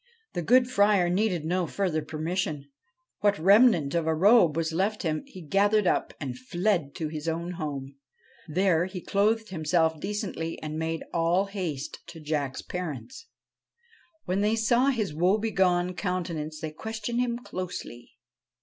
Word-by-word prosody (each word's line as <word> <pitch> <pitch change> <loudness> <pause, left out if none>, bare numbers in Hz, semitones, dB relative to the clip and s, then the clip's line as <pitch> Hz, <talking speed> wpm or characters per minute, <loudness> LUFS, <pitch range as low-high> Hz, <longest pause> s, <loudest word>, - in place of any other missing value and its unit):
The 175 - -2
good 245 +7 +4
Friar 200 -6 +3
needed 180 -4 0
no 180 +1 0
further 175 -3 -1
permission. 155 -2 -3 0.5
What 205 -1 +2
remnant 195 - +5
of 170 -2 0
a 160 - +2
robe 180 -3 +5
was 165 -1 -1
left 200 +5 0
him 155 -2 -1
he 185 - -11
gathered 205 +5 +2
up, - - +1
and 130 -4 -5
fled 175 +2 -1
to 160 - -3
his 155 0 -6
own 170 +2 -2
home. 140 -5 -5 0.5
There 175 +1 +2
he 185 0 -6
clothed 215 +4 +1
himself 160 -2 +1
decently 195 -4 -4
and 155 0 -4
made 160 0 -2
all 170 +3 +2
haste 180 -9 -4
to 170 -1 -10
Jack's 145 -3 -2
parents. 180 - -6 1.0
When 185 +2 0
they 210 +2 +2
saw 235 +4 +3
his 220 - 0
woebegone 185 0 +2
countenance 170 -5 -3
they 155 -1 -4
questioned 220 +6 -4
him 240 -1 0
closely. 180 - -7
180 Hz, 150 wpm, -27 LUFS, 160-205 Hz, 1.0 s, remnant